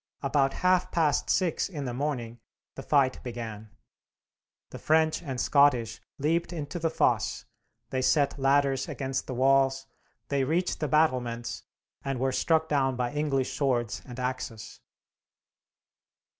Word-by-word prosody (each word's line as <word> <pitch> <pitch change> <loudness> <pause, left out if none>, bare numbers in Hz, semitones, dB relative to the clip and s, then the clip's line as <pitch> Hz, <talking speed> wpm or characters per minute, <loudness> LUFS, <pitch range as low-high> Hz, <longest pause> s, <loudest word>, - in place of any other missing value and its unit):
About 135 0 +2
half 185 0 +3
past 155 -4 +1
six 180 -2 +1
in 150 -7 -5
the 125 - -3
morning 120 -4 -3 0.3
the - - -8
fight 135 -2 +2
began. 115 -3 -7 1.0
The - - -8
French 160 +1 +2
and 135 -6 -5
Scottish 125 -7 +3 0.2
leaped 165 +4 0
into 155 0 -5
the 165 0 0
fosse, - - 0 0.5
they 130 - 0
set 140 +1 +2
ladders 135 -1 +2
against 135 -1 -3
the 130 - -4
walls, 135 +1 +3 0.4
they 140 -1 +1
reached 170 +6 0
the 150 - -1
battlements, 125 -6 0 0.4
and 135 -2 -3
were 130 +1 +1
struck 160 +3 +1
down 135 -3 +1
by 125 0 -2
English 145 -3 -1
swords 120 -6 0
and 125 -2 -9
axes. 125 -3 -5
135 Hz, 135 wpm, -28 LUFS, 125-150 Hz, 1.0 s, half